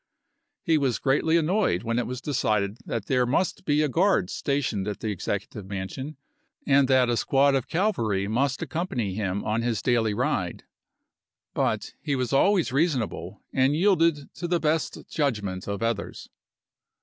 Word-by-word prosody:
He 160 -2 +3
was 130 -6 +1
greatly 145 +4 +2
annoyed 170 - +1
when 115 +1 0
it 120 - -2
was 125 0 -5
decided 110 -7 0
that 115 -3 -3
there 125 -2 +2
must 170 +8 0
be 150 0 +3
a - - +2
guard 165 - +2
stationed 130 -8 -1
at 105 - -4
the 110 - -2
Executive 100 +1 -4
Mansion, 100 +10 -5 0.5
and 140 -1 +4
that 130 -1 +4
a 120 - +1
squad 140 +4 +3
of 135 -3 0
cavalry 115 - 0
must 125 +6 0
accompany 135 - -2
him 100 -1 -2
on 110 +1 0
his 115 -3 0
daily 115 -4 +2
ride; - - -1 0.9
but - - -1
he 145 -3 -1
was 125 -2 -2
always 175 -1 +3
reasonable 140 -6 -1
and 130 +2 +3
yielded 165 -5 +2
to 175 - -5
the 175 0 +1
best 160 +1 -1
judgment 105 - -2
of 100 +2 -3
others. 115 -3 -3
130 Hz, 160 wpm, -26 LUFS, 110-150 Hz, 0.9 s, and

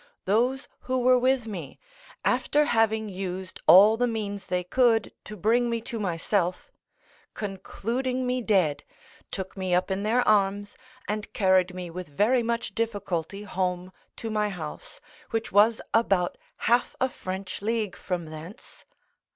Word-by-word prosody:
Those 245 +7 +1 0.2
who 255 - +2
were 250 0 +4
with 255 -1 +2
me, 185 -9 -7 0.5
after 295 +1 +2
having 220 -3 +2
used 185 -1 -6
all 210 +4 +8
the 245 +1 +2
means 205 -3 -4
they 180 0 -1
could 225 +2 +2
to 215 - -8
bring 235 +5 +2
me 230 0 0
to 230 0 -5
myself, 180 -1 -1 0.6
concluding 240 +6 -3
me 250 0 0
dead, 185 -10 +2 0.5
took 190 0 -5
me 185 -2 0
up 180 +2 0
in 190 +1 -1
their 230 +4 +1
arms, 205 -1 +2 0.3
and 210 +1 -3
carried 185 -2 +3
me 180 -2 -6
with 180 +1 -6
very 210 - +2
much 235 0 -2
difficulty 200 -4 -3
home 185 -2 -2 0.2
to 225 - -5
my 210 -1 +1
house, 165 -6 -8 0.3
which 225 0 -2
was 215 +3 +5
about 195 -6 +2 0.3
half 240 +2 +2
a 260 - +3
French 190 -6 -6
league 220 -2 -1
from 180 -3 -4
thence. 160 +7 -11
205 Hz, 145 wpm, -26 LUFS, 185-230 Hz, 0.6 s, all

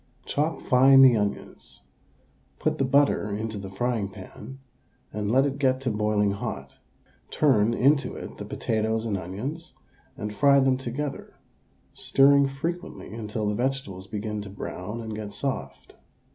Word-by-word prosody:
Chop 155 +3 -1
fine 135 +1 +7
the 130 -3 +7
onions. 105 -2 -4 0.8
Put - - -1
the - - +3
butter 140 -5 +3
into 110 0 -4
the 95 -1 -7
frying 110 0 -1
pan, 135 +6 -11 0.6
and 105 0 -2
let 135 +3 +4
it 140 0 -2
get 130 -1 +1
boiling 105 -1 +1
hot, 100 - -5 0.6
turn 120 -6 +3
into 140 0 +2
it - - -9
the - - -5
potatoes 110 0 -1
and 110 -3 -1
onions, 105 - -5 0.4
and 105 -4 -4
fry 140 +5 +5
them 130 -1 +3
together, 135 +3 -5 0.6
stirring 140 0 +4
frequently 165 +1 -5
until 110 -1 -3
the 105 - 0
vegetables 120 -6 -3
begin 105 +1 -4
to 100 - -8
brown 100 +3 -6
and 110 -1 -6
get 105 -1 -6
soft. 135 +5 -5
115 Hz, 145 wpm, -26 LUFS, 105-135 Hz, 0.8 s, fine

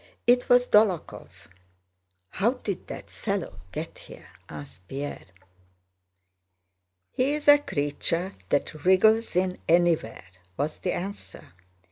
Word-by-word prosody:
It 245 +1 +3
was 245 0 +5
Dólokhov. 210 -6 +2 1.0
"How 225 +6 +1
did 205 -8 -5
that - - -9
fellow - - -4
get - - -6
here?" - - -13 0.2
asked 75 +4 -11
Pierre. 140 +4 -6 1.9
"He's 290 +3 -1
a 290 0 +9
creature 165 - -2 0.2
that 145 - 0
wriggles 215 +4 +4
in 185 0 0
anywhere!" 165 - +2 0.3
was 150 +2 -2
the 180 - -1
answer. 195 +3 -7
185 Hz, 105 wpm, -26 LUFS, 145-230 Hz, 1.9 s, a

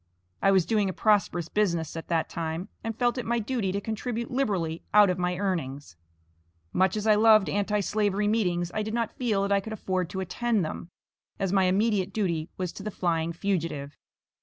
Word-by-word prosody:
I 195 - +4
was 190 -3 +4
doing 210 -4 +1
a - - -3
prosperous 200 -6 +2
business 170 -6 0
at 165 - -6
that 165 -2 0
time 165 +4 -4
and 225 -1 -4
felt 245 +1 +1
it - - -3
my 235 +1 +1
duty 225 -3 -1
to 200 - -1
contribute 225 +3 -4
liberally 190 -11 -1
out 205 -3 +7
of 180 - -3
my 180 0 0
earnings. 145 - -3 0.8
Much 190 +2 +2
as 210 - -3
I 215 - +6
loved 215 -1 +6
Anti 205 +1 0
slavery 205 0 0
meetings 180 -5 0
I 215 - -1
did 215 +1 -3
not 230 -2 -1
feel 215 -6 0
that 200 - -1
I 200 - +4
could 220 +3 -6
afford 185 -4 -2
to 190 - -5
attend 205 +2 0
them, 165 +2 -6 0.5
as 195 -1 -1
my 190 -1 +4
immediate 195 0 +1
duty 170 -6 -1
was 180 -2 -2
to - - -9
the 215 - -4
flying 170 -4 -1
fugitive. 165 -6 -2
195 Hz, 200 wpm, -27 LUFS, 175-215 Hz, 0.8 s, out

